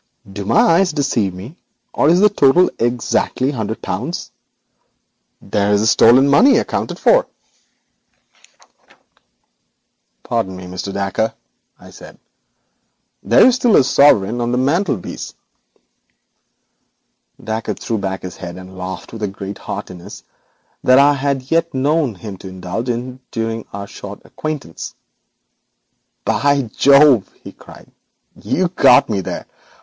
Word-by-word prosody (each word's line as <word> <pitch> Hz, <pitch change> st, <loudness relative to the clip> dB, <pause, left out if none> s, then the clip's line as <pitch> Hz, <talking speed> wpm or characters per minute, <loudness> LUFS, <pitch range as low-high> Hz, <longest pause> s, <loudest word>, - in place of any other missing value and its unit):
Do 100 Hz, 0 st, -6 dB
my -, -, +1 dB
eyes 180 Hz, +2 st, +3 dB
deceive 135 Hz, -9 st, -1 dB
me, 100 Hz, -, -11 dB, 0.4 s
or 145 Hz, -, +2 dB
is 175 Hz, +3 st, +4 dB
the 210 Hz, -1 st, +4 dB
sum 145 Hz, +7 st, +5 dB
exactly 120 Hz, +2 st, 0 dB
a -, -, -7 dB
hundred 110 Hz, -1 st, -4 dB
pounds? 130 Hz, -, -4 dB, 1.1 s
There 100 Hz, +1 st, 0 dB
is 110 Hz, +2 st, +2 dB
your 115 Hz, -, +8 dB
money 135 Hz, +3 st, +4 dB, 0.2 s
fully -, -, +5 dB
accounted -, -, -3 dB
for.' -, -, +3 dB, 3.0 s
'Pardon 115 Hz, -6 st, -2 dB
me, 90 Hz, 0 st, -9 dB
Mr. 90 Hz, +2 st, -6 dB
Dacre,' 100 Hz, +3 st, -2 dB, 0.4 s
I -, -, -15 dB
said, -, -, -14 dB, 1.1 s
'but -, -, +5 dB
I -, -, +7 dB
observe 245 Hz, -3 st, +3 dB
a -, -, +6 dB
sovereign 140 Hz, -4 st, +5 dB, 0.2 s
resting -, -, -3 dB
on 120 Hz, 0 st, -1 dB
the 125 Hz, -, 0 dB
mantelpiece.' 140 Hz, -, -2 dB, 2.1 s
Dacre 110 Hz, -1 st, -3 dB
threw 115 Hz, -2 st, -3 dB
back 95 Hz, -1 st, -4 dB
his 90 Hz, -1 st, -8 dB
head 85 Hz, 0 st, -8 dB
and 95 Hz, 0 st, -12 dB
laughed 95 Hz, +3 st, -7 dB
with 105 Hz, -3 st, -4 dB
greater 100 Hz, 0 st, -8 dB
heartiness 90 Hz, -3 st, -8 dB, 0.6 s
than 130 Hz, 0 st, +5 dB
I 140 Hz, +1 st, +6 dB
had 135 Hz, -1 st, -3 dB
yet 165 Hz, -2 st, +1 dB
known 140 Hz, -2 st, 0 dB
him 100 Hz, 0 st, -9 dB
to 95 Hz, -, -11 dB
indulge 95 Hz, +6 st, -5 dB
in 125 Hz, +2 st, -4 dB
during 115 Hz, -1 st, -4 dB
our 100 Hz, 0 st, -6 dB
short 100 Hz, 0 st, -10 dB
acquaintance. 150 Hz, -, -6 dB, 1.3 s
'By 140 Hz, -5 st, +1 dB
Jove,' 140 Hz, -5 st, +5 dB
he -, -, -9 dB
cried, -, -, -16 dB, 0.4 s
'you've 180 Hz, 0 st, -2 dB
got 125 Hz, -, +5 dB
me 100 Hz, -3 st, -2 dB
there. -, -, -6 dB
120 Hz, 135 wpm, -17 LUFS, 100-140 Hz, 3.0 s, your